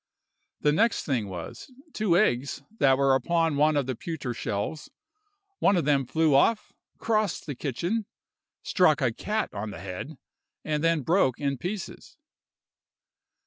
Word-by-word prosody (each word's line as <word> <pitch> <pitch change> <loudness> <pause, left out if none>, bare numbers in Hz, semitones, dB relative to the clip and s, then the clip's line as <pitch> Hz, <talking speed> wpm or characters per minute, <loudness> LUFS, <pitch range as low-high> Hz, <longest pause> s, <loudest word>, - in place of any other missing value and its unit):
"The 150 - +3
next 225 +10 +1
thing 120 -8 -1
was, 90 - -8 0.2
two 195 -6 +2
eggs 140 - +1 0.2
that 135 -1 +5
were 135 -1 +3
upon 165 +4 +1
one 150 +1 +3
of 140 - +1
the 130 -1 -3
pewter 145 -4 -5
shelves, 105 +7 -4 0.7
one 195 - +4
of 170 - 0
them 140 -3 +2
flew 160 0 +2
off, 210 +11 +2 0.2
crossed 215 -4 0
the 145 - -4
kitchen, 175 - -2 0.6
struck 170 -5 +3
a 125 -5 +1
cat 215 - -2
on 105 +1 -4
the 100 - -8
head, 95 - -7 0.5
and 150 0 -1
then 165 -2 +2
broke 160 -5 +2
in 140 -3 -1
pieces. 185 +4 -6
150 Hz, 145 wpm, -27 LUFS, 130-175 Hz, 0.7 s, that